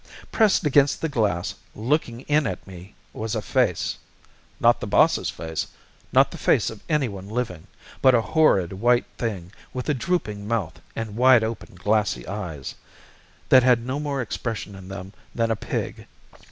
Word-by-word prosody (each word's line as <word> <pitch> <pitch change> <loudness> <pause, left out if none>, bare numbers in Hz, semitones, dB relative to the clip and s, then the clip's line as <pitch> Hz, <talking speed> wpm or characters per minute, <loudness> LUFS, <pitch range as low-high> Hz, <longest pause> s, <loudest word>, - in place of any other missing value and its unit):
Pressed 215 -7 +3
against 145 -1 +4
the 160 - -1
glass, 105 -10 0 0.2
looking 120 0 -1
in 150 +1 +1
at 95 - -5
me, 95 +1 -12 0.2
was 110 0 -3
a - - -1
face - - 0 0.6
not - - +4
the - - -5
boss's - - +3
face, 80 -1 -4 0.4
not - - +5
the - - -8
face - - +2
of 110 - -11
anyone 110 - -1
living, 110 -8 -3 0.3
but 130 -1 +6
a 115 - +4
horrid 100 - +4
white 120 +5 +2
thing 95 -7 -3 0.2
with 125 - -4
a - - +4
drooping 110 - -2
mouth 110 -7 -2
and 110 -2 -4
wide 125 -1 +6
open, 110 -4 -5
glassy 105 - 0
eyes, 90 -8 -5 0.8
that 130 - +8
had 120 -2 +3
no 130 +3 -2
more 140 -3 -2
expression 115 -3 -4
in 95 -1 -11
them 95 0 -8 0.2
than 115 -1 +1
a - - +2
pig. - - -4
115 Hz, 165 wpm, -24 LUFS, 95-130 Hz, 0.8 s, that